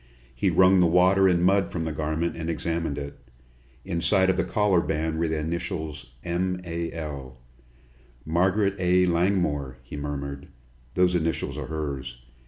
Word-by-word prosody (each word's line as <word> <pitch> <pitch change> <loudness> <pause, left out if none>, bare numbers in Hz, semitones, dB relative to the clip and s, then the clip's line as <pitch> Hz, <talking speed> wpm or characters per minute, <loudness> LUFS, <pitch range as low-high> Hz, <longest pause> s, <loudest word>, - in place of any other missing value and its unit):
He - - +1
wrung 95 0 +5
the 90 - +5
water 90 +3 +5
and 90 -2 +3
mud 95 +1 +3
from 85 - -2
the 80 - -2
garment 80 +2 -2
and 85 0 -4
examined 80 -2 -2
it. 70 0 -6 0.7
Inside 95 +1 +2
of - - -2
the - - +1
collar 105 -4 +2
band 80 0 -2
were 85 - +1
the 80 0 -1
initials, 80 -2 -4 0.2
"M. 90 +1 -1
A. 85 -1 -3
L." 70 -6 -7 0.9
"Margaret 95 +5 +2
A. 90 0 +3
Langmore," 85 -7 0
he - - -8
murmured. 70 -1 -5 0.5
"Those 90 0 +3
initials 80 -3 -1
are - - -5
hers. 70 -6 -4
85 Hz, 155 wpm, -26 LUFS, 75-90 Hz, 0.9 s, wrung